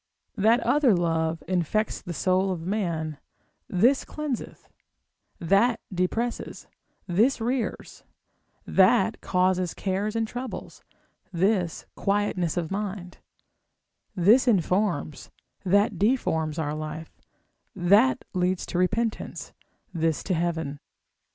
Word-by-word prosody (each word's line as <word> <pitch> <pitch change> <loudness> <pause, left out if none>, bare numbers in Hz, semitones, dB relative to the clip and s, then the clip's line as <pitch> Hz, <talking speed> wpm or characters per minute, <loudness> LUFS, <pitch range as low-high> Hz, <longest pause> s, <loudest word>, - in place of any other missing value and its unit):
That 225 +3 +3
other 280 -8 +3
love 165 -2 0
infects 185 +4 0
the 175 - -7
soul 185 +3 +1
of 170 -3 -4
man, 165 -7 -2 0.5
this 240 +9 +3
cleanseth; 300 -6 -5 0.7
that 205 +7 +3
depresses, 225 +7 -2 0.4
this 215 +10 +2
rears; 240 +1 -3 0.6
that 195 +2 +3
causeth 185 -1 +1
cares 200 +3 -2
and 225 -1 0
troubles, 245 +3 -7 0.5
this 185 -1 0
quietness 195 -4 0
of 170 -1 -2
mind; 195 -3 -5 1.0
this 215 +8 +5
informs, 180 - 0 0.3
that 200 0 +2
deforms 160 - +1
our 150 -2 -2
life; 155 +1 -6 0.6
that 205 +9 +3
leads 180 0 0
to 175 - -3
repentance, 215 +5 -2 0.4
this 165 -2 0
to 190 - -1
heaven. 160 -4 -2
185 Hz, 100 wpm, -26 LUFS, 170-215 Hz, 1.0 s, this